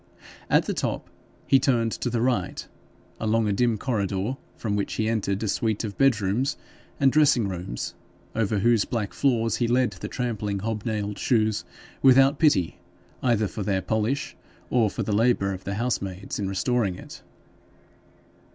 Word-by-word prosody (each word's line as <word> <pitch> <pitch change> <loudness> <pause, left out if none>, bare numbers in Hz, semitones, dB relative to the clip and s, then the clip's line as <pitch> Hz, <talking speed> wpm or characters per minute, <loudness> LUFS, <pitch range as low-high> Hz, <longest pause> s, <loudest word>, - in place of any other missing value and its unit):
At - - +4
the - - -1
top - - -3 0.3
he 135 - +5
turned 120 -4 +2
to 125 - -2
the 115 -1 0
right, 125 -1 -1 0.5
along 110 0 +1
a 105 - +1
dim 120 +1 +2
corridor, 105 -1 -1 0.2
from 105 -3 -2
which 100 - -2
he 110 - -1
entered 105 -2 -1
a - - -1
suite 110 +1 0
of 105 -3 -4
bedrooms 125 0 +2 0.4
and 135 -1 +5
dressing 140 -8 +4
rooms, 90 -9 -5 0.4
over 110 -2 0
whose 115 +1 +3
black 110 -4 -3
floors 115 -5 +1
he 120 - +1
led 125 +1 +2
the - - -7
trampling 110 -5 -2
hob 110 +2 -3
nailed 105 -3 -2
shoes 110 -4 +1 0.4
without 135 +2 +6
pity 95 - +2 0.4
either 115 -4 +2
for 105 - -6
their 95 -1 0
polish 110 +7 -1 0.4
or 115 -4 +3
the 105 - -3
labour 105 -2 +2
of 95 0 -8
the 100 - -2
housemaids 100 -5 -3
in 100 -2 -1
restoring 100 0 0
it. - - -11
110 Hz, 160 wpm, -25 LUFS, 100-125 Hz, 0.5 s, without